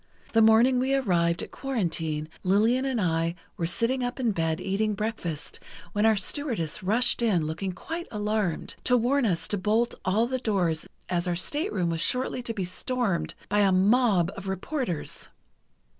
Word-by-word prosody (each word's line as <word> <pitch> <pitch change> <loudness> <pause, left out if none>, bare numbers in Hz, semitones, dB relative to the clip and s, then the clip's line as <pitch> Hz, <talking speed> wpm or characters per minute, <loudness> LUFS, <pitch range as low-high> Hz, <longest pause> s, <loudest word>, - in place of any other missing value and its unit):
The 225 - +5
morning 230 +4 +5
we 265 +2 +1
arrived 170 -9 +1
at - - -9
Quarantine 165 - -2
Lillian 220 +8 +3
and 260 -3 0
I 165 -2 0 0.2
were 165 - -1
sitting 240 +8 0
up 245 +2 -3
in 240 -4 +2
bed 165 -4 -1
eating 210 +2 0
breakfast 195 -8 -4 0.3
when 210 +2 +3
our 220 - +5
stewardess 210 - -2
rushed 230 +7 +2
in 195 -9 +2
looking 165 +5 -3
quite 330 - -6
alarmed, 210 -4 -1
to 250 - +4
warn 250 +2 +2
us 175 -5 0
to 205 - 0
bolt 220 +5 +1
all 210 +5 +2
the 260 +1 -2
doors 180 -9 0 0.2
as 175 0 -1
our 175 - 0
stateroom 185 - 0
was 165 0 -2
shortly 250 +4 0
to 235 -1 -4
be 195 - -2
stormed 200 +1 -1
by 205 - +1
a 200 -2 +4
mob 195 -2 +3
of 195 0 -7
reporters. 190 - -3
210 Hz, 170 wpm, -27 LUFS, 175-245 Hz, 0.3 s, The